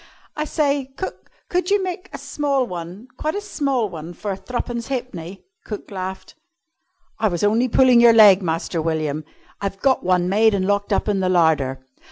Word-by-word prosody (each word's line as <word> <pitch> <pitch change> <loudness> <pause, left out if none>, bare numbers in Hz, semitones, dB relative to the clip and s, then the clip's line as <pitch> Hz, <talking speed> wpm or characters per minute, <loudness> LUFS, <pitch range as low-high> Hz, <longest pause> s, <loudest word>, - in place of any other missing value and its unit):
"I 305 - -2
say, 280 -3 0
cook, 375 - -6 0.2
could 360 +1 -1
you 405 -1 +2
make 370 +1 -5
a - - -6
small 280 -3 -1
one 180 +3 -8
quite 310 +3 -2
a - - -1
small 275 - -1
one 170 -2 -8
for 200 +1 -4
threepence 240 +2 -4
halfpenny?" 195 -9 -5 0.2
Cook 210 -1 -7
laughed. 190 0 -6 0.9
"I 220 - +2
was 175 -3 -2
only 225 +5 +3
pulling 250 0 +5
your 235 -1 +8
leg, 205 -3 +7
Master 165 -1 -2
William. 155 -2 -2 0.4
I've 195 -1 -3
got 265 +2 +2
one 180 -1 +2
made 215 +3 +3
and 190 -1 0
locked 205 +1 0
up - - +1
in 205 -2 +1
the 185 -1 0
larder." 150 -7 +2
205 Hz, 180 wpm, -21 LUFS, 180-260 Hz, 0.9 s, your